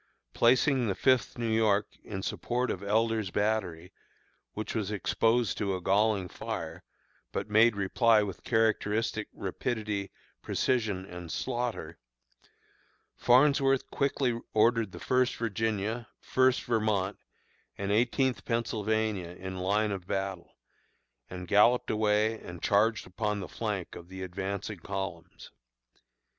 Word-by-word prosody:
Placing 125 +1 +3
the 95 - 0
Fifth 130 -2 +2
New 115 -1 -1
York 105 -2 +3 0.2
in 95 -2 -6
support 125 +4 -1
of 95 - -4
Elder's 110 0 +1
battery, 95 -5 -1 0.6
which 110 - -4
was 105 -4 -1
exposed 115 +1 +1
to 100 -3 0
a - - -3
galling 100 +1 +2
fire, - - -6 0.5
but 105 - -4
made 110 +1 +5
reply 105 +3 +3
with 100 -3 -6
characteristic 110 -1 +1
rapidity, 105 -4 -3 0.3
precision, 110 -7 0
and 90 -3 -8
slaughter, 125 -2 -3 1.2
Farnsworth 135 +1 +3
quickly 130 -4 0
ordered 115 -1 +3
the - - -9
First 125 -1 +1
Virginia, 110 +1 -2
First 130 0 +2
Vermont, 105 -4 0 0.6
and 100 0 -2
Eighteenth 125 +4 +1
Pennsylvania 110 -5 -1
in 95 0 -6
line 105 +3 +1
of 95 -2 -5
battle, 95 -2 -3 0.7
and 90 -1 -7
galloped 110 +6 +4
away 110 +1 +2
and 85 -1 -10
charged 110 +2 +2
upon 105 +3 -2
the 95 - -5
flank 105 -6 -4
of 85 +1 -11
the 95 0 -7
advancing 100 +2 -4
columns. 95 -1 -6
105 Hz, 120 wpm, -29 LUFS, 95-115 Hz, 1.2 s, made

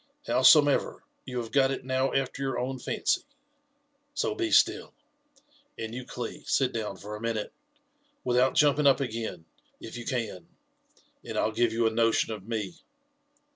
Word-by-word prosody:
Howsomever, 145 - +4 0.2
you 125 -1 -5
have 115 -2 -4
got 135 -1 +4
it 135 - -4
now 130 +1 0
after 135 0 -1
your 135 -2 -1
own 130 +1 -3
fancy; - - 0 0.9
so 450 +6 0
be 355 -5 -1
still. - - +3 0.8
And 110 0 -5
you 125 +1 -6
Cli, 120 -2 -6
sit 130 -2 +2
down 105 -4 -4
for 105 +2 -7
a 105 - -9
minute, 115 -2 -3 0.7
without 125 +1 +2
jumping 145 0 +4
up 135 - +5
again, 115 -9 -4 0.3
if 115 - -9
you 120 - -7
can, 115 -8 -3 0.8
and - - -6
I'll 110 - +1
give 120 +1 +1
you 115 +1 +1
a 110 - +3
notion 115 0 +2
of 105 -1 -9
me. 115 +8 -4
125 Hz, 160 wpm, -28 LUFS, 110-135 Hz, 0.9 s, up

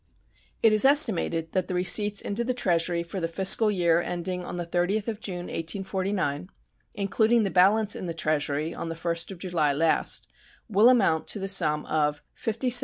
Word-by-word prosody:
It 225 -1 +5
is 215 - +5
estimated 200 - +3
that 185 -1 -1
the 180 - -4
receipts 205 +3 +1
into 210 +4 -2
the 250 +1 -2
Treasury 170 -5 0
for 170 +3 -7
the 165 - -2
fiscal 190 +5 +4
year 175 -4 +1
ending 180 +1 -4
on 175 - -7
the 175 - -4
30th 180 +5 -1
of 220 -2 -4
June, 180 -5 -5
1849, 185 - -2 0.5
including 220 +3 +1
the 195 - -2
balance 205 +3 +3
in 185 - -6
the 165 - -5
Treasury 155 0 -2
on 165 - -6
the 165 - -5
1st 170 0 -2
of 195 - -8
July 170 -5 -1
last, 160 +3 0 0.4
will 215 +2 +4
amount 195 -11 +2
to - - 0
the 195 -1 -4
sum 150 -6 +1
of 150 -1 -1
$57,048,969. 240 +2 +2
180 Hz, 180 wpm, -25 LUFS, 165-210 Hz, 0.5 s, It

